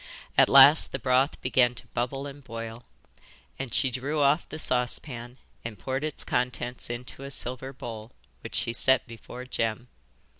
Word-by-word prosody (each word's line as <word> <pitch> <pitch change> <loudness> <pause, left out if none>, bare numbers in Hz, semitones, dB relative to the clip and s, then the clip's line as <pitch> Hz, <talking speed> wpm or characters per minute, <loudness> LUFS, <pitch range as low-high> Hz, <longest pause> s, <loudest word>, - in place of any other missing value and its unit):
At - - +5
last 140 +3 +8
the - - -2
broth 130 +2 +1
began 125 -1 +3
to - - -8
bubble 135 +3 -3
and 140 0 -9
boil, 115 -1 -7 0.7
and 135 -3 -4
she 130 +2 +1
drew 140 +5 -2
off 145 +3 +2
the 155 - -6
saucepan 125 -2 -2 0.3
and 115 -2 -6
poured 130 +8 -3
its 155 -1 -2
contents 125 0 -2
into 120 +2 -6
a 140 - -6
silver 130 0 -3
bowl, 115 -3 -8 0.3
which - - -8
she 115 - -1
set 130 +2 +3
before 120 +2 -10
Jem. 120 -1 -3
125 Hz, 160 wpm, -27 LUFS, 120-135 Hz, 0.7 s, last